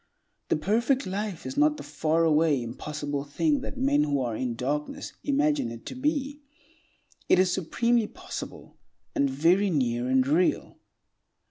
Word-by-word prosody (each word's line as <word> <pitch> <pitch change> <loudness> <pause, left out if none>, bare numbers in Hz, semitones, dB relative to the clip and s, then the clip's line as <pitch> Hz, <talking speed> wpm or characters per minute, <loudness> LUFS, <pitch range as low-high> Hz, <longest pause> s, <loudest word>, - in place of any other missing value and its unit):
The - - +2
perfect 230 - +1
life 195 -1 -4
is 270 - -5
not 300 +1 +3
the - - -8
faraway, 160 -2 +2
impossible 145 +4 -4
thing 280 - 0
that 270 - -7
men 275 +2 +2
who 145 -2 +1
are 120 -3 -2
in 120 0 -2
darkness 145 +5 -3
imagine 290 - +1
it 115 0 -9
to - - -6
be; 285 +1 -2 0.9
it - - +6
is 185 0 +3
supremely 230 +6 +1
possible, - - -9 0.4
and 140 - +2
very 170 +9 +3
near 125 -6 0
and 130 0 +3
real. 160 +6 +1
165 Hz, 145 wpm, -27 LUFS, -, 0.9 s, it